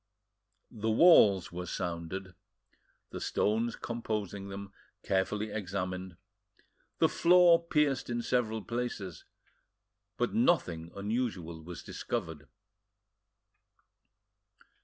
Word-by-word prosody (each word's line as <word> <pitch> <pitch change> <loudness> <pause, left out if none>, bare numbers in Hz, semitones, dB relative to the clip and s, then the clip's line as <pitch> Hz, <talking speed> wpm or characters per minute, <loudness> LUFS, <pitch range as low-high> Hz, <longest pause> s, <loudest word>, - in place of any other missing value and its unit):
The 110 +1 -3
walls 110 - +6
were 90 +1 -5
sounded, 90 +2 -4 0.8
the - - -6
stones 115 +3 0
composing 105 -4 -4
them 100 0 -8 0.3
carefully 105 +3 0
examined, 95 -3 -4 0.8
the - - +4
floor 175 -1 +5
pierced 150 -7 +1
in 120 0 -2
several 110 -4 0
places, 115 -8 -4 0.9
but 120 - 0
nothing 90 - +1
unusual 100 -6 -3
was 85 0 -9
discovered. 75 -2 -5
100 Hz, 85 wpm, -31 LUFS, 90-120 Hz, 0.9 s, walls